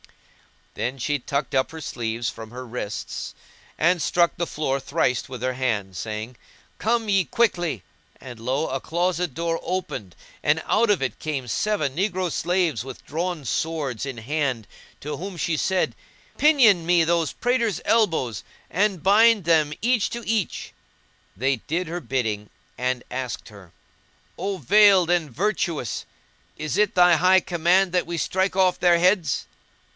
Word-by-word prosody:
Then 125 Hz, +3 st, -3 dB
she 145 Hz, +3 st, -1 dB
tucked 140 Hz, +2 st, -3 dB
up 130 Hz, -1 st, +2 dB
her 160 Hz, 0 st, -8 dB
sleeves 115 Hz, -3 st, -3 dB
from 110 Hz, -1 st, -9 dB
her 125 Hz, +2 st, -8 dB
wrists 115 Hz, -3 st, -5 dB, 0.4 s
and 175 Hz, +1 st, +2 dB
struck 170 Hz, +1 st, +2 dB
the 170 Hz, -, -1 dB
floor 140 Hz, -3 st, -1 dB
thrice 130 Hz, -2 st, 0 dB
with 125 Hz, -2 st, -7 dB
her 130 Hz, 0 st, 0 dB
hand 110 Hz, -7 st, -2 dB
crying, 110 Hz, +2 st, -5 dB, 0.4 s
"Come 230 Hz, 0 st, +1 dB
ye 195 Hz, -2 st, +3 dB
quickly;" 175 Hz, -, 0 dB, 0.4 s
and 125 Hz, -3 st, -10 dB
lo! 130 Hz, +7 st, -1 dB
a 135 Hz, -, -2 dB
closet 175 Hz, 0 st, -1 dB
door 165 Hz, 0 st, -1 dB
opened 130 Hz, -, -4 dB, 0.3 s
and 155 Hz, +2 st, +1 dB
out 225 Hz, +1 st, +2 dB
of 200 Hz, -9 st, +2 dB
it 130 Hz, -5 st, -3 dB
came 140 Hz, -5 st, -3 dB
seven 205 Hz, -, 0 dB
negro 185 Hz, -1 st, -1 dB
slaves 170 Hz, -, 0 dB
with 130 Hz, -1 st, -10 dB
drawn 165 Hz, 0 st, -3 dB
swords 140 Hz, -1 st, -2 dB
in 135 Hz, -3 st, -6 dB
hand 130 Hz, -1 st, -2 dB, 0.4 s
to 150 Hz, -, -4 dB
whom 190 Hz, 0 st, -6 dB
she 165 Hz, 0 st, 0 dB
said, 190 Hz, +3 st, 0 dB, 0.4 s
"Pinion 250 Hz, -, +5 dB
me 175 Hz, -1 st, +4 dB
those 165 Hz, -1 st, +1 dB
praters' 235 Hz, -6 st, 0 dB
elbows 160 Hz, -, +1 dB, 0.3 s
and 195 Hz, -3 st, +1 dB
bind 215 Hz, +1 st, +5 dB
them 155 Hz, -2 st, +3 dB
each 240 Hz, -2 st, +2 dB
to 235 Hz, -1 st, -6 dB
each." 220 Hz, -6 st, -2 dB, 0.6 s
They 135 Hz, +4 st, +1 dB
did 165 Hz, +10 st, -3 dB
her 175 Hz, +2 st, -4 dB
bidding 110 Hz, -9 st, -2 dB, 0.3 s
and 125 Hz, 0 st, -1 dB
asked 125 Hz, -2 st, -4 dB
her, 100 Hz, -5 st, -15 dB, 0.7 s
"O 195 Hz, +2 st, -2 dB
veiled 195 Hz, -3 st, +5 dB
and 170 Hz, -4 st, +1 dB
virtuous! 165 Hz, -, -2 dB, 0.5 s
is 155 Hz, -3 st, -3 dB
it 210 Hz, -1 st, +2 dB
thy 175 Hz, -2 st, +6 dB
high 185 Hz, +3 st, +5 dB
command 175 Hz, +2 st, +2 dB
that 180 Hz, -1 st, 0 dB
we 170 Hz, 0 st, -3 dB
strike 190 Hz, +3 st, 0 dB
off 185 Hz, -2 st, +3 dB
their 175 Hz, -1 st, +5 dB
heads?" 180 Hz, -4 st, +2 dB
165 Hz, 155 wpm, -24 LUFS, 130-185 Hz, 0.7 s, thy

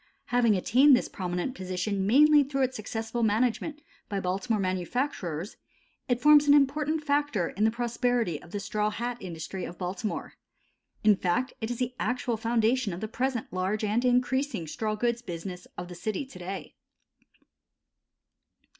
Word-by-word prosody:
Having 235 Hz, -3 st, +4 dB
attained 260 Hz, +9 st, +5 dB
this -, -, -1 dB
prominent 180 Hz, +6 st, -3 dB
position 190 Hz, -1 st, -2 dB
mainly 295 Hz, +5 st, +6 dB
through 275 Hz, 0 st, -1 dB
its 260 Hz, 0 st, -1 dB
successful 225 Hz, +2 st, -4 dB
management 245 Hz, +7 st, 0 dB, 0.3 s
by 200 Hz, -2 st, -1 dB
Baltimore 195 Hz, +4 st, -1 dB
manufacturers, 185 Hz, -, -2 dB, 0.5 s
it 245 Hz, -1 st, +2 dB
forms 295 Hz, +2 st, +6 dB
an 285 Hz, -, +8 dB
important 300 Hz, +2 st, +2 dB
factor 285 Hz, -, +1 dB
in 210 Hz, +3 st, 0 dB
the -, -, +5 dB
prosperity 235 Hz, -, 0 dB
of -, -, -14 dB
the 205 Hz, -, -4 dB
straw 210 Hz, +1 st, -1 dB
hat 240 Hz, +3 st, -3 dB
industry 175 Hz, +1 st, -6 dB
of 175 Hz, -, -7 dB
Baltimore. 185 Hz, +4 st, -4 dB, 0.7 s
In 210 Hz, -1 st, +6 dB
fact 195 Hz, +8 st, 0 dB
it 220 Hz, -, -2 dB
is 245 Hz, -, -3 dB
the 250 Hz, 0 st, -2 dB
actual 250 Hz, -1 st, -1 dB
foundation 230 Hz, -1 st, +1 dB
of 170 Hz, -, -5 dB
the 220 Hz, -, -3 dB
present 245 Hz, -1 st, -2 dB
large 190 Hz, +4 st, -1 dB
and 215 Hz, +3 st, +1 dB
increasing 250 Hz, -, +1 dB
straw 215 Hz, +7 st, -2 dB
goods 235 Hz, +2 st, 0 dB
business 180 Hz, -3 st, -7 dB
of 180 Hz, -, -5 dB
the 180 Hz, -, -9 dB
city 215 Hz, +9 st, -3 dB
to 225 Hz, -8 st, -13 dB
day. 190 Hz, +2 st, -6 dB
225 Hz, 155 wpm, -28 LUFS, 190-255 Hz, 0.7 s, an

